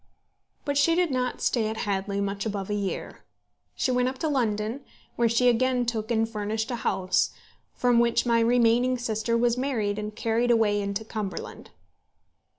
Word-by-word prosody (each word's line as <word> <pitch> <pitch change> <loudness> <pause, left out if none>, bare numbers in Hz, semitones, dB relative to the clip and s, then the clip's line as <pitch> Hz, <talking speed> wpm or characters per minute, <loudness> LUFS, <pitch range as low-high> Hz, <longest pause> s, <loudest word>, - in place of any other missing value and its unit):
But 285 -1 +1
she 330 +3 +4
did 350 -3 +1
not 250 -1 -2
stay 225 -3 +1
at 220 0 -4
Hadley 200 0 -1
much 200 0 -2
above 205 -2 -3
a - - +1
year. 200 -2 -4 0.5
She 255 - 0
went 250 0 +2
up 260 - -7
to 315 - -2
London, 230 -2 -1 0.3
where 235 -1 +2
she 235 +2 +3
again 250 +1 +2
took 225 -2 -3
and 225 -1 +1
furnished 220 +1 -3
a 240 - -2
house, 185 -5 +1 0.5
from 245 -1 +3
which 235 0 +2
my 235 -1 +3
remaining 240 +2 +3
sister 230 -1 -1
was 240 0 +2
married 220 -7 -1
and 210 0 -5
carried 230 +2 0
away 215 -3 +3
into 200 +2 -3
Cumberland. 215 -3 -6
230 Hz, 170 wpm, -26 LUFS, 210-245 Hz, 0.5 s, she